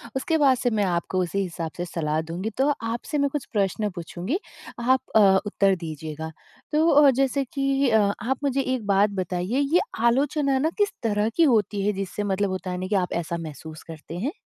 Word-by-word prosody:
उसके 320 +5 +1
बाद 270 -4 +4
से 245 - 0
मैं - - +3
आपको 180 +1 -1
उसी 180 +3 -2
हिसाब 165 -3 -4
से 175 - -2
सलाह 155 -2 -1
दूँगी 185 +6 -3
तो 275 +2 +3 0.2
आपसे 240 +5 -3
मैं 280 0 +2
कुछ 290 -2 -4
प्रश्न 205 +1 0
पूछूँगी 180 - -3 0.4
आप 260 +2 +3 0.2
अ, 195 -3 +6
उत्तर 195 -1 +2
दीजिएगा 160 -1 -6 0.4
तो 310 +2 +3
अ, 290 -1 +7
जैसे 270 +1 +1
कि 275 -1 +1
अ 220 -1 +4 0.2
आप 255 +4 -1
मुझे 275 -1 +1
एक 255 -4 -2
बात 200 +1 +4
बताइए 185 - -1
ये 355 - +6 0.3
आलोचना 275 +2 +2
ना 315 +3 +2
किस 410 -1 +2
तरह 210 0 +1
की 335 - +4
होती 205 -2 +1
है 210 - +2
जिससे 195 +1 -4
मतलब 200 0 0
होता 185 0 -4
है 180 - -3
नहीं 185 +1 -4
कि 205 - +1
आप 180 -2 0
ऐसा 170 0 -2
महसूस 155 0 -8
करते 165 +1 -9
हैं? 260 - -2
205 Hz, 205 wpm, -24 LUFS, 180-265 Hz, 0.4 s, अ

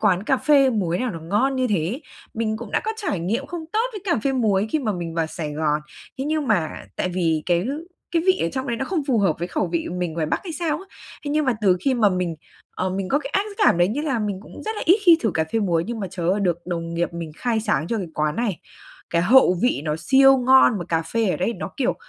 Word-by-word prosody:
quán 185 0 +2
cà 265 +5 +2
phê 275 -3 +4
muối 180 -6 0
nào 255 -2 -1
nó 165 - -7
ngon 215 +11 0
như 255 - +1
thế. 205 - -1 0.3
Mình 220 -1 -1
cũng 230 -2 -8
đã - - +1
có 440 - -1
trải 365 - -2
nghiệm 225 +11 -2
không 335 0 -6
tốt 445 +3 +2
với 415 - -6
cà 345 - +1
phê 270 - +2
muối 215 -5 +1
khi 310 - +1
mà 220 -7 -1
mình 170 -2 -5
vào 165 -1 0
Sài 155 -2 -5
Gòn, 150 0 0 0.4
thế 265 - -2
nhưng 305 -2 -1
mà 180 -9 +1 0.3
tại 185 - -1
vì 165 -4 0
cái 175 +2 +1 0.4
cái 335 -1 +1
vị 375 0 +4
ở 165 - +1
trong 260 0 -3
đấy 235 - -1
nó 265 - -2
không 335 -3 -1
phù 240 -4 +3
hợp 190 -6 +2
với 175 +2 -3
khẩu 185 - -1
vị 170 -1 -2
mình 175 -3 -2
ngoài 160 -1 -2
Bắc - - -1
hay 340 - -5
sao 310 -1 -1
á, 385 - -11 0.4
thế 285 - -3
nhưng 305 +1 +1
mà 255 -3 +2
từ 185 -3 +4
khi 270 +4 +1
mà 220 -4 +4
mình, 180 -3 -1 0.4
ờ, 185 0 -1
mình 190 0 -3
có 285 - +2
cái 275 -1 -7
ác 390 - +1
cảm 410 - +4
đấy, 175 +1 +4
nghĩa 275 +9 -2
là 270 -6 0
mình 205 -3 -2
cũng - - -11
rất 440 0 -4
là - - -3
ít 365 +6 +5
khi 335 -2 +7
thử 225 - +1
cà 160 - +1
phê 225 - +1
muối. 170 -4 +1
Nhưng 235 -1 -4
mà, 195 - -2
trời 175 -3 -3
ơi, 200 +2 +1
được 175 -3 +1
đồng 170 -1 -4
nghiệp 170 0 -1
mình 170 -2 -6
khai 230 -3 0
sáng 165 -8 0
cho 230 - -1
cái 190 -4 -3
quán 150 0 0
này, 225 -7 -1 0.5
cái 170 0 +2
hậu 195 -2 +5
vị 245 - +2
nó 150 - 0
siêu 270 +7 +5
ngon 255 -3 +5
mà 175 - -4
cà 165 0 0
phê 225 +6 -1
ở - - 0
đây 205 +6 0
nó, - - -6
kiểu, 260 -2 +1
210 Hz, 285 wpm, -23 LUFS, 175-270 Hz, 0.5 s, khi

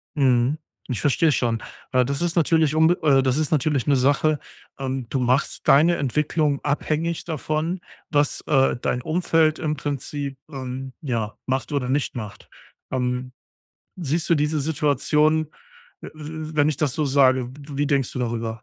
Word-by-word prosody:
Mhm. 130 0 +3 0.3
Ich 110 - -2
verstehe 155 +2 +3
schon. 115 -4 0 0.3
Äh, 130 -1 +4
das 140 +4 -2
ist 170 0 -1
natürlich 160 -2 +3
umbe 160 +3 +5
äh, 135 -3 +5
das 130 +1 +1
ist 155 -1 0
natürlich 145 -3 +1
'ne 140 - +3
Sache, 145 +3 +2 0.4
ähm 130 -2 -3
du 135 - -1
machst 125 +3 0
deine 165 +5 +5
Entwicklung 145 +1 0
abhängig 155 +3 -1
davon, 160 +2 -2 0.3
was, 145 -2 +1
äh, 135 -2 +3
dein 125 0 -2
Umfeld 160 -2 +2
im 155 -2 -1
Prinzip, 140 -1 -4
ähm, 130 -1 -6
ja, 115 -6 -3
macht 130 +3 -2
oder 135 -3 -1
nicht 135 0 0
macht. 105 -4 -8 0.4
Ähm, 125 0 -2 0.6
siehst 165 0 -2
du 170 - +5
diese 150 0 0
Situation, 150 +1 +2 0.5
w - - -8
w 155 0 -7
wenn 145 0 +4
ich 150 - 0
das 150 -5 0
so 155 - 0
sage, 130 -2 +3
w 140 +1 -10
wie 145 0 +1
denkst 140 -4 +1
du - - -5
darüber? 115 -1 -3
145 Hz, 165 wpm, -23 LUFS, 130-155 Hz, 0.6 s, umbe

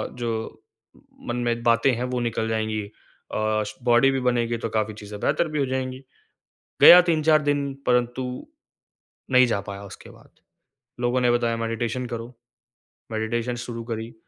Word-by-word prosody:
जो 115 -2 -4 0.7
मन 120 - -1
में 120 0 -1
बातें 115 +3 +3
है 120 - -3
वो 125 - 0
निकल 115 -1 -1
जाएँगी। 110 -1 -1
अ, 100 - -12 0.7
स 105 +1 -7
बॉडी 120 +3 +5
भी 135 - -1
बनेगी 120 -2 0
तो 115 - -4
काफ़ी 110 -1 -1
चीजें 105 0 -9
बेहतर 165 - +1
भी 150 -1 -2
हो 140 - +2
जाएँगी, 130 0 -3 0.8
गया 180 - +11
3-4 155 -1 +3
दिन 145 -1 0
परंतु 125 +1 +1 1.1
नहीं 125 0 +6
जा 105 -4 -1
पाया 100 0 -7
उसके 100 - -12
बाद। - - -18 0.7
लोगों 120 +1 +1
ने 125 -1 +3
बताया 120 -1 +1
मेडिटेशन 115 +2 -3
करो। 115 -1 -5 0.9
मेडिटेशन 115 +2 -2
शुरू 115 -1 -6
करी, 115 0 -6
120 Hz, 155 wpm, -24 LUFS, 115-125 Hz, 1.1 s, गया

